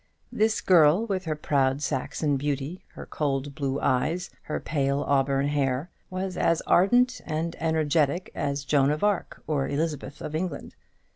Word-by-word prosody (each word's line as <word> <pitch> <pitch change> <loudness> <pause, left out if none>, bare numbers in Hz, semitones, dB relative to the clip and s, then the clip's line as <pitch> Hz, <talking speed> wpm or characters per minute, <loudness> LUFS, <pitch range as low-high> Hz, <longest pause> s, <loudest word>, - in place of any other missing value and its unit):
This 215 +1 +1
girl, 175 +3 +5
with 190 -4 -2
her 155 -1 -1
proud 140 -1 +1
Saxon 145 +2 -1
beauty, 145 +4 -3
her - - -8
cold 140 -1 -2
blue 140 -1 -2
eyes, 165 +8 0
her 155 - -4
pale 140 -2 0
auburn 140 0 +1
hair, 140 +2 -1 0.2
was 185 0 -4
as 165 -1 +2
ardent 245 +7 +3
and 160 +2 -3
energetic 160 +1 +1
as 140 0 -2
Joan 140 -1 +3
of 150 +4 -1
Arc 205 -3 -1
or 145 -3 0
Elizabeth 145 -1 -3
of 155 -1 -6
England. 160 -2 -4
150 Hz, 150 wpm, -26 LUFS, 140-175 Hz, 0.2 s, girl